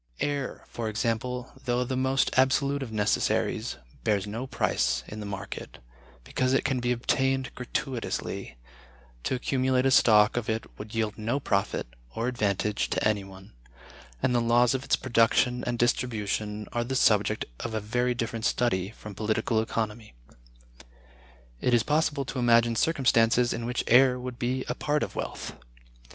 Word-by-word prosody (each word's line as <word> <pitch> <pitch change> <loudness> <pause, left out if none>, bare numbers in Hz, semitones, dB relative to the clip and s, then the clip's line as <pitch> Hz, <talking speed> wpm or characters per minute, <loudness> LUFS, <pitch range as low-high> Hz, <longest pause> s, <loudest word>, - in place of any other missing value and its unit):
Air, 145 -3 -2
for 115 -2 -4
example, 115 +3 -2
though 125 0 +1
the 130 +1 -3
most 130 +1 +1
absolute 140 +2 +2
of 125 -4 -5
necessaries, 105 -1 0 0.3
bears 100 -3 +1
no 115 +5 -5
price 125 - 0
in 105 - -7
the 105 - -5
market, 100 -1 -7 0.5
because 130 - 0
it 135 - +3
can 130 -2 +1
be 120 0 0
obtained 135 +2 0
gratuitously; 125 - -4 0.7
to - - 0
accumulate 130 0 +1
a 135 - +4
stock 105 -2 +5
of 120 -2 -2
it 110 0 -1
would 105 +2 -8
yield 110 -1 -1
no 115 +6 -1
profit 100 -6 0 0.3
or 115 - -1
advantage 105 -4 0
to - - +1
any 105 -2 0
one; 95 -3 -13 0.7
and 125 - +2
the 120 - +3
laws 120 +1 +4
of 130 0 -2
its - - +2
production 125 0 +2
and 120 0 -1
distribution 110 -3 -1
are 120 - 0
the 130 +3 -3
subject 105 -3 +3
of 115 -2 -4
a - - +1
very 120 +4 0
different 115 -1 -3
study 95 -6 +1
from 105 -1 -10
Political 110 +2 0
Economy. 110 - -4 1.4
It 125 - +3
is 115 - +3
possible 150 -2 +1
to 130 - -4
imagine 115 -1 +4
circumstances 125 -4 +3
in 115 0 -4
which 125 0 -1
air 125 +1 +5
would 125 -1 -6
be 130 +2 -1
a - - -1
part 150 0 0
of - - -5
wealth. - - -5
120 Hz, 160 wpm, -27 LUFS, 110-130 Hz, 1.4 s, stock